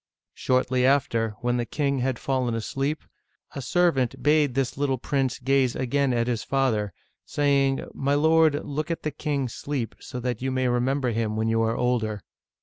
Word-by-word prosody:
Shortly 130 0 +1
after, 115 -5 +2
when 120 0 +1
the 120 - -1
king 140 -2 0
had 130 -1 0
fallen 130 -3 -1
asleep, 135 +7 -2 0.5
a 140 - -5
servant 140 -6 +1
bade 150 -3 +3
this 135 -2 0
little 135 -1 0
prince 135 +1 -1
gaze 130 -1 +1
again 135 +1 +1
at 120 -1 +1
his 120 -2 -1
father, 115 -7 0 0.3
saying, 140 -2 +1
" - - -19
My 140 +1 0
lord, 160 0 +3
look 150 +3 -3
at 165 - -3
the 155 - -1
king 140 -1 -2
asleep, 125 0 -4
so 125 - -7
that 125 -2 -3
you 130 - -1
may 130 -1 0
re 120 0 +2
member 130 0 0
him 110 -1 -1
when 110 +1 0
you 115 0 +2
are 115 0 0
older." 110 -5 0
130 Hz, 185 wpm, -25 LUFS, 120-140 Hz, 0.5 s, bade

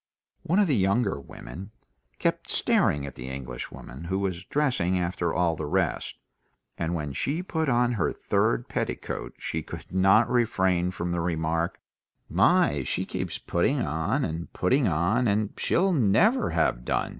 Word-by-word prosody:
One 175 - 0
of 210 - +5
the 150 -7 +2
younger 100 - +1
women 85 - -9 0.5
kept - - -1
staring 70 -1 +2
at 70 - -7
the 60 +1 -8
Englishwoman, 65 +2 -7
who 95 +3 -1
was 95 -2 -2
dressing 125 -12 +1
after 90 0 -1
all 85 -1 +1
the 75 -1 -4
rest, - - -1 0.6
and 85 +1 -2
when 75 -4 -3
she 155 - -1
put 160 -5 -1
on 120 0 +3
her 110 -8 0
third 110 +4 0
petticoat - - -4
she 80 - -3
could - - -9
not 95 +5 +5
refrain 95 -7 +2
from 85 -1 -3
the 85 -1 0
remark, 85 0 -1 0.5
"My, 70 -1 +3
she 65 - -2
keeps - - -4
putting - - 0
on 80 +2 0
and 80 +2 -5
putting 130 +8 +2
on, 95 +9 +2
and 105 0 +1
she'll 190 +2 +2
never 160 - +3
have - - +1
done!" - - 0
95 Hz, 155 wpm, -27 LUFS, 80-120 Hz, 0.6 s, of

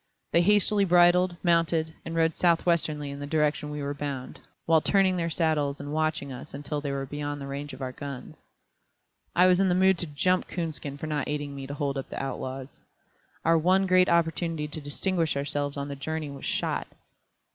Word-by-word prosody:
They 170 - +5
hastily 205 +2 +3
bridled, 175 0 +4
mounted, 165 -2 +2
and 165 - -5
rode 165 -1 +2
southwesterly 165 -4 +1
in 140 - -7
the 145 - -5
direction 150 -1 0
we 150 -1 -4
were 140 +1 -2
bound, 140 -3 -5 0.3
while 160 -1 +4
turning 195 +1 +3
in - - -2
their 170 -1 -1
saddles 155 -4 0
and 145 +1 -6
watching 155 -3 -1
us 125 +1 -8
until 145 +1 -3
they 145 -1 -3
were 135 0 -2
beyond 145 0 -5
range 140 +1 -5
of 130 +1 -7
our 130 - -3
guns. 140 0 -9 0.9
I 180 - +6
was 180 0 +5
in 195 -1 +3
the 180 - +3
mood 190 -1 +4
to 175 - -2
"jump" 180 +6 +1
Coonskin 155 -5 -4
for 150 - -6
not 150 -3 -2
aiding 145 -1 -3
me 135 -1 -6
to 140 - -5
hold 140 -1 -1
up 135 - -7
the - - -5
outlaws. 135 0 -5 0.6
Our 165 0 +5
one 185 +4 +3
great 185 0 +4
opportunity 165 -2 +1
to 155 +1 -6
distinguish 160 +2 -1
ourselves 145 0 -2
on 140 0 -3
the 140 - -5
journey 155 +1 -4
was 140 - -5
lost. - - -2
155 Hz, 200 wpm, -27 LUFS, 145-170 Hz, 0.9 s, I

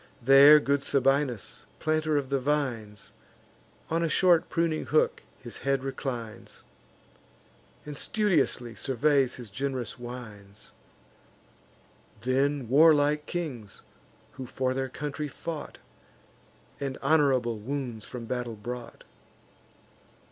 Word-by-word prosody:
There 140 +4 +8
good 140 -1 0
Sabinus, 135 -4 0
planter 155 -1 0
of 140 -2 -3
the 140 - +2
vines, 125 -7 -2 0.8
On 165 +1 +1
a 165 - 0
short 175 -1 +3
pruning 165 -2 -1
hook 155 - +2 0.2
his 120 -3 -9
head 135 -1 -1
reclines, 120 -5 -6 1.2
And 150 -1 -6
studiously 150 - 0
surveys 135 0 +1
his 120 -5 -10
gen'rous 130 +1 -4
wines; 110 -5 -10 1.5
Then 135 +2 0
warlike 150 +2 +4
kings, 135 - -5 0.5
who 130 -1 -8
for 130 +1 -1
their 130 0 -2
country 150 +2 -4
fought, 150 +2 -7 1.0
And 135 -1 -4
honourable 135 -6 +2
wounds 125 -2 -5
from 120 -2 -7
battle 120 -1 -4
brought. 120 +3 -8
135 Hz, 105 wpm, -28 LUFS, 120-150 Hz, 1.5 s, There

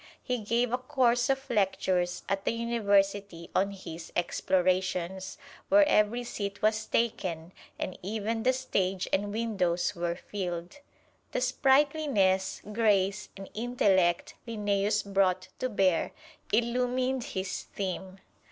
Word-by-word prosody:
He 250 -2 -1
gave 230 +3 0
a 250 - +1
course 250 -2 +2
of 270 0 0
lectures 185 -3 0
at 195 0 -1
the - - 0
University 200 -6 0
on 195 +1 +2
his 175 -4 -8
explorations, 185 +1 0 0.3
where 300 +1 +6
every 235 -2 +3
seat 200 -4 -4
was 215 0 +2
taken, 185 -7 -1 0.2
and 185 - -4
even 220 +3 -2
the 255 +3 +4
stage 195 -8 -1
and 205 +1 +1
windows 195 -6 0
were 170 0 -1
filled. 180 +2 -5 0.6
The - - 0
sprightliness, 265 -7 +2
grace 205 -2 +2
and 195 0 -8
intellect 200 -7 +2
Linnæus 210 -1 0
brought 190 -2 +1
to 255 - -1
bear 190 -6 +2 0.4
illumined 250 +3 +1
his 190 -2 -4
theme. 190 -1 -5
200 Hz, 120 wpm, -29 LUFS, 185-235 Hz, 0.6 s, where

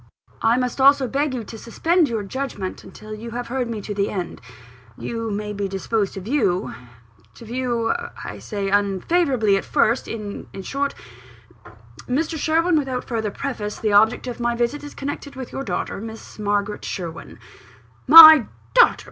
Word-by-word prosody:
"I 230 +2 +3
must 250 +1 -2
also 275 -1 +5
beg 280 +2 -1
you 240 - -4
to 220 +1 -10
suspend 325 +8 +1
your 225 -3 -2
judgment 205 -4 -5
until 215 0 -11
you 220 +2 -7
have 245 - -5
heard 250 -1 -2
me 220 -2 -4
to 205 - -5
the 200 0 -1
end. 180 -3 -5 0.6
You 230 -1 -4
may 210 0 -4
be 200 -1 -3
disposed 195 +2 -2
to 195 - -6
view 205 -5 0 0.6
to 230 - -12
view, 235 -1 -1 0.3
I - - -7
say, 200 -2 -4
unfavourably 205 - +2
at - - -3
first 235 +4 +1
in 210 -3 -6 0.2
short, 280 +6 -2 1.1
Mr. 315 +6 -1
Sherwin, 320 +2 +2
without 260 -3 -3
further 220 -3 -3
preface, 210 -3 -5
the 215 -2 -1
object 220 +5 +4
of 245 -1 -6
my 240 0 0
visit 240 +5 -1
is 290 - -9
connected 285 0 -6
with 260 -2 -7
your - - -5
daughter, 195 -10 -3
with 210 - -7
Miss 220 -1 -10
Margaret 205 0 -1
Sherwin 170 -3 -6 0.4
" - - -30
"My 315 -6 +12 0.3
daughter! 485 -1 +6
230 Hz, 170 wpm, -22 LUFS, 205-275 Hz, 1.1 s, My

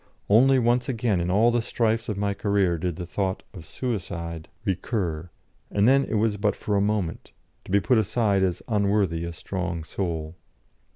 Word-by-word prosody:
Only 130 +5 +6
once 120 +1 +2
again 115 -7 0
in 85 - -1
all 110 +6 +4
the 120 0 +1
strifes 115 0 0
of 105 - -2
my 100 0 0
career 100 -4 +1
did 90 -1 -2
the 90 - -5
thought 95 +1 -2
of 90 - -9
suicide 85 -10 -4 0.2
recur, 90 -4 -2 0.4
and 100 +2 +2
then 135 +1 +5
it - - -3
was 105 -1 +1
but 105 -1 +1
for 105 - -2
a 100 - +3
moment, 100 -5 -2 0.3
to - - -9
be 100 - +5
put 115 +4 +3
aside 105 -2 +1
as 90 -2 0
unworthy 100 -6 +1
a 85 - -4
strong 90 -1 -4
soul. 80 -2 -4
100 Hz, 180 wpm, -25 LUFS, 90-110 Hz, 0.4 s, Only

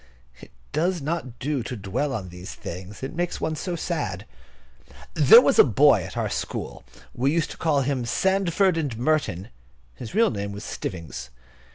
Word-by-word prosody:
It - - -13 0.2
does 175 +4 0
not 140 -5 -4
do 140 -1 -2
to 120 +2 -5
dwell 120 +9 -2
on 105 -8 -4
these 90 +1 -9
things; 95 +6 -8
it 135 - -4
makes 175 +1 -2
one 155 0 -1
so 175 +3 -3
sad. 165 - -3 0.9
There 470 - +8
was - - +2
a - - +11
boy - - +5
at - - -8
our - - 0
school, - - -5 0.3
we 130 +3 +1
used 165 0 0
to - - -9
call 150 -4 +1
him 130 -2 -1
Sandford 190 +5 +2
and 140 -8 -2
Merton. 120 - 0 0.4
His 110 - -9
real 230 +1 +4
name 100 -2 -4
was 100 +1 -7
Stivvings. 80 - -6
135 Hz, 175 wpm, -24 LUFS, 105-165 Hz, 0.9 s, a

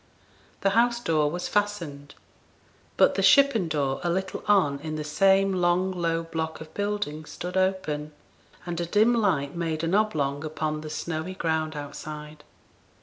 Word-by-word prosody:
The 195 - +2
house 235 +2 +3
door 155 -9 +1
was 175 +3 -3
fastened; 165 -9 -2 0.8
but - - +5
the - - 0
shippen 275 - +5
door 140 -4 -1
a 175 - 0
little 190 +2 -2
on 180 -9 +3
in 155 +1 -5
the 155 - -3
same 195 +5 +3
long 180 +1 +2
low 165 -2 -1
block 160 -1 -4
of 160 0 -11
building 205 -7 -2
stood 180 +4 -7
open, 185 -6 0 0.5
and 175 -1 -3
a 170 - -2
dim 215 +6 +4
light 175 -12 +1
made 165 -2 -2
an 165 +2 0
oblong 150 -9 +1
upon 155 0 -3
the 155 - -7
snowy 160 +3 -4
ground 160 -3 -1
outside. 150 +1 -8
165 Hz, 155 wpm, -26 LUFS, 155-190 Hz, 0.8 s, but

